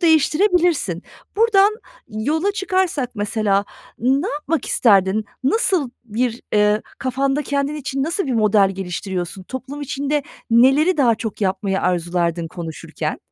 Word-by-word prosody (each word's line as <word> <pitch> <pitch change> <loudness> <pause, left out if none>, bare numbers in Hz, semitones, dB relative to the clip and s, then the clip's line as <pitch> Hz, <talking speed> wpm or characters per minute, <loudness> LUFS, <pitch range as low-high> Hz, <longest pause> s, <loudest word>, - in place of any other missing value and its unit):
değiştirebilirsin. 325 - +2 0.3
Buradan 425 -1 +4 0.3
yola 300 - -1
çıkarsak 370 - 0
mesela 205 -1 0 0.3
ne 270 - +1
yapmak 300 0 -2
isterdin? 200 -1 +3 0.2
Nasıl 335 - +1
bir, 235 +1 -2
ııı, 210 0 +3 0.2
kafanda 270 +2 0
kendin 280 +1 -1
için 270 -2 -3
nasıl 335 +5 -1
bir 265 - -1
model 210 -3 +4
geliştiriyorsun? 185 -1 -4
Toplum 260 +7 -7
içinde 285 +1 -1 0.3
neleri 270 +10 +5
daha 250 -6 +4
çok 220 -1 -6
yapmayı 195 0 0
arzulardın 170 -1 0
konuşurken? 165 -2 -5
255 Hz, 115 wpm, -20 LUFS, 200-300 Hz, 0.3 s, neleri